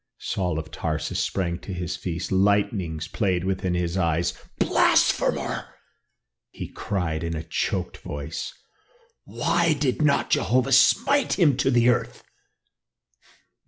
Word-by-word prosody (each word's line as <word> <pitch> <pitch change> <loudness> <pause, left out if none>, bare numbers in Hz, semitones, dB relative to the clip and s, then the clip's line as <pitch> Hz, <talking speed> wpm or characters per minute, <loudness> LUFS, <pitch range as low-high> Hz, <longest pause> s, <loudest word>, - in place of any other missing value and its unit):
Saul 90 -4 -2
of 80 0 -6
Tarsus 80 0 -3
sprang 85 -2 -1
to 100 - -9
his 90 -1 -3
feet, 85 0 -4
lightnings 95 -4 +1
played 95 -5 0
within 95 -1 -1
his 90 +1 -1
eyes. 85 -1 +1 0.2
"Blasphemer!" - - +2 0.7
he - - -8
cried 80 -6 -3
in 85 0 -2
a 80 - -4
choked - - -2
voice. 75 +2 -5 0.7
"Why 170 -1 +1
did 140 -1 -1
not 150 -2 +2
Jehovah 130 +2 +2
smite 275 - +4
him 155 -8 +4
to 135 - +2
the 120 -1 +4
earth?" 90 - -1
95 Hz, 125 wpm, -24 LUFS, 85-125 Hz, 0.7 s, smite